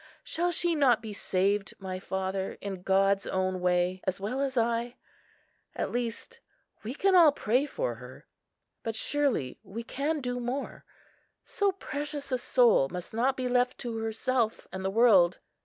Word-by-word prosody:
Shall 350 Hz, +2 st, 0 dB
she 345 Hz, 0 st, +1 dB
not 265 Hz, -8 st, +3 dB
be 215 Hz, -2 st, -6 dB
saved, 195 Hz, +1 st, 0 dB
my 185 Hz, -1 st, -5 dB
father, 190 Hz, 0 st, -3 dB
in 195 Hz, -2 st, -6 dB
God's 195 Hz, +1 st, +2 dB
own 185 Hz, 0 st, -1 dB
way, 180 Hz, +1 st, +1 dB
as 190 Hz, 0 st, -2 dB
well 220 Hz, +8 st, -2 dB
as 270 Hz, -2 st, -1 dB
I? 235 Hz, +1 st, 0 dB, 0.8 s
At -, -, -2 dB
least 245 Hz, -, -4 dB, 0.4 s
we 230 Hz, +5 st, -5 dB
can 390 Hz, +4 st, +2 dB
all 340 Hz, -5 st, +8 dB
pray 255 Hz, +1 st, +1 dB
for -, -, -2 dB
her; -, -, -12 dB, 0.6 s
but 225 Hz, -1 st, -4 dB
surely 260 Hz, -, 0 dB
we 225 Hz, +4 st, -7 dB
can 285 Hz, +5 st, -2 dB
do 245 Hz, -2 st, -3 dB
more—so 280 Hz, +9 st, -4 dB
precious 290 Hz, -5 st, -5 dB
a 255 Hz, -, +1 dB
soul 235 Hz, -, +4 dB
must 180 Hz, +5 st, -7 dB
not 255 Hz, +4 st, +1 dB
be 255 Hz, -1 st, -1 dB
left 250 Hz, 0 st, +1 dB
to 235 Hz, -2 st, -4 dB
herself 225 Hz, +1 st, -1 dB
and 190 Hz, 0 st, -5 dB
the 190 Hz, -, 0 dB
world. 195 Hz, -5 st, +5 dB
235 Hz, 155 wpm, -29 LUFS, 195-270 Hz, 0.8 s, all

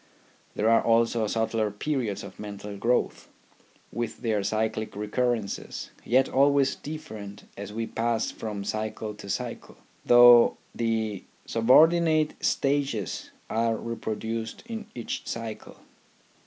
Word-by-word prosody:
There 105 Hz, -, +1 dB
are 115 Hz, 0 st, +5 dB
also 115 Hz, -1 st, +2 dB
subtler 110 Hz, 0 st, 0 dB
periods 110 Hz, -1 st, -2 dB
of 100 Hz, -1 st, -11 dB
mental 105 Hz, 0 st, -7 dB
growth, 120 Hz, +5 st, 0 dB, 0.6 s
with 120 Hz, 0 st, -4 dB
their 110 Hz, -3 st, +1 dB
cyclic 110 Hz, +1 st, -2 dB
recurrences, 110 Hz, +1 st, -2 dB
yet 130 Hz, +2 st, +3 dB
always 140 Hz, 0 st, +3 dB
different 110 Hz, -10 st, -8 dB
as 100 Hz, 0 st, -7 dB
we 115 Hz, +2 st, -3 dB
pass 115 Hz, 0 st, -1 dB
from 105 Hz, -2 st, -5 dB
cycle 110 Hz, +1 st, -3 dB
to 105 Hz, -1 st, -11 dB
cycle, -, -, -5 dB, 0.3 s
though 120 Hz, -1 st, +7 dB, 0.2 s
the 110 Hz, -4 st, -1 dB, 0.2 s
subordinate 155 Hz, +6 st, +4 dB
stages 135 Hz, -, 0 dB, 0.2 s
are 115 Hz, 0 st, +1 dB
repro 115 Hz, -1 st, -4 dB
duced 110 Hz, +1 st, -5 dB
in 225 Hz, -2 st, -6 dB
each 120 Hz, -, -5 dB
cycle. 115 Hz, -1 st, -6 dB
115 Hz, 115 wpm, -27 LUFS, 105-125 Hz, 0.6 s, though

